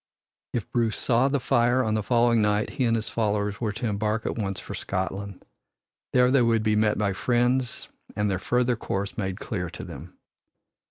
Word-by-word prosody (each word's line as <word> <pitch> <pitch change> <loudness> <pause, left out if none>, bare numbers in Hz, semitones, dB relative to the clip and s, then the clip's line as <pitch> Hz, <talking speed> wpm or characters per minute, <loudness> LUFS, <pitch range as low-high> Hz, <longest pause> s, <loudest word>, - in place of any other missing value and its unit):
If 115 -4 -2
Bruce 115 -3 +1
saw 125 +2 +2
the 140 0 +1
fire 125 0 +2
on 110 - 0
the 110 - +1
following 120 +1 +3
night 105 0 +1
he 130 - 0
and 115 -1 +2
his 110 -1 -2
followers 105 -2 -1
were 110 -3 0
to 115 +4 -4
embark 105 +1 -1
at - - -1
once 100 -4 -2
for - - -8
Scotland. 95 +1 -4 0.7
There 125 0 +4
they 135 -1 +5
would 115 -2 +2
be 110 -1 +2
met 105 0 +2
by 100 -2 +1
friends 125 +3 0 0.3
and 105 0 +1
their 95 -3 0
further 125 +4 +1
course 100 -3 -3
made 95 -3 -3
clear 90 -6 -3
to - - -8
them. - - -10
110 Hz, 195 wpm, -26 LUFS, 105-120 Hz, 0.7 s, they